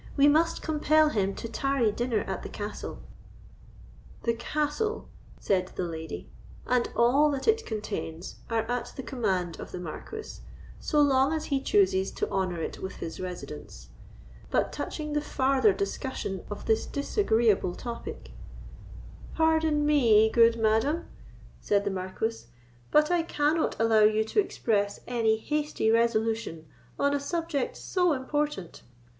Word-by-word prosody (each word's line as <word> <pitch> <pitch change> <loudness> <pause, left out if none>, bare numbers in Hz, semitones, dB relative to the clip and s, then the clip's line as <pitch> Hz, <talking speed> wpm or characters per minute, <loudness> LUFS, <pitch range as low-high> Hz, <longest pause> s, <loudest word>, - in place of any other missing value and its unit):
We 280 +1 +6
must 320 +3 +3
compel 310 0 +3
him 195 -7 0
to - - -5
tarry 245 -1 +1
dinner 235 -1 -1
at 190 -1 -4
the - - -7
castle." 205 0 -6 1.2
"The 235 - +2
castle," 300 - -2 0.3
said 185 -2 +1
the - - -2
lady, 160 -2 -6 0.4
"and 250 -1 +1
all 270 +6 +4
that 275 -2 -3
it 450 0 +2
contains, 205 -6 -5
are 225 -1 +1
at 245 +2 -3
the 265 - -6
command 195 -9 -2
of - - -8
the - - -5
Marquis, 300 - -7 0.4
so 300 - 0
long 275 0 +4
as 315 -1 -2
he 275 -2 0
chooses 270 - +2
to - - -2
honour 185 -4 -1
it - - -5
with 190 - -5
his 165 - -6
residence; 150 - -8 0.6
but - - +1
touching 300 -1 -4
the 295 - +1
farther 260 -6 +2
discussion 195 -1 -3
of 205 - -6
this 220 -1 +1
disagreeable 230 - +1
topic——" 235 - -7 1.0
"Pardon 320 -2 +2
me, 225 -7 +5
good 230 0 +5
madam," 225 +10 +2 0.5
said 200 -1 +1
the - - 0
Marquis; 190 - -3 0.4
"but 300 +2 +4
I 350 -1 +3
cannot 310 -3 0
allow 225 -1 +4
you 215 +1 +4
to 220 - 0
express 205 - 0
any 225 -3 +1
hasty 295 -2 0
resolution 225 -7 +1 0.3
on 280 0 +2
a 285 - +1
subject 305 -2 -2
so 360 -3 +1
important. 280 - -3
235 Hz, 140 wpm, -28 LUFS, 205-295 Hz, 1.2 s, We